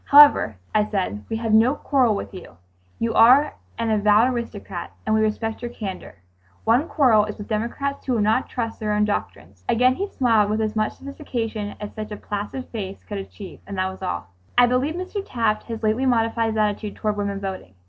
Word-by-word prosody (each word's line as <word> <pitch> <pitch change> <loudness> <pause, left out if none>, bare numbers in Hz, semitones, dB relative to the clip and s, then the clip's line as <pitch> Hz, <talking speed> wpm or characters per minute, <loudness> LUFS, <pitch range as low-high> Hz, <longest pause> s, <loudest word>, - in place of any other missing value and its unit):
"However," 290 - +7 0.2
I 210 - +4
said, 180 - -2
"we 225 - -2
have 225 -1 -1
no 230 +6 +5
quarrel 255 -8 +2
with 200 - -6
you. 180 - -11 0.4
You 230 0 -1
are 255 +7 +6 0.2
an 230 -1 0
avowed 215 +4 +4
aristocrat, 205 -6 -6
and 215 - +1
we 220 - +3
respect 220 +1 -1
your 240 - -4
candor. 195 - -7 0.4
Our 230 +4 +4
quarrel 235 -11 +4
is 210 - -6
with 205 - -8
democrats 235 +6 -2
who 255 - +1
will 230 - +1
not 220 +5 +2
trust 230 -3 -4
their 210 -2 -1
own 210 0 +3
doctrines." 100 - -4
Again 250 +2 +4
he 395 +9 -3
smiled 225 - +2
with 215 +1 0
as 215 0 -1
much 215 0 0
sophistication 235 -7 -5
as 210 - -7
such 215 0 -6
a 210 - -5
placid 210 +6 -5
face 195 -4 -6
could 205 -1 -5
achieve, 195 0 -9
and 200 -1 -6
that 185 0 0
was 190 - -12
all. 90 +1 -4 0.3
I 245 - +8
believe 255 +6 0
Mr. 370 +3 -4
Taft 225 - -1
has 225 -1 -6
lately 220 +5 +1
modified 230 -1 +2
his 220 0 -2
attitude 210 0 -1
toward 215 -1 -1
women 200 -1 -2
voting. 190 - -6
220 Hz, 205 wpm, -23 LUFS, 205-240 Hz, 0.4 s, I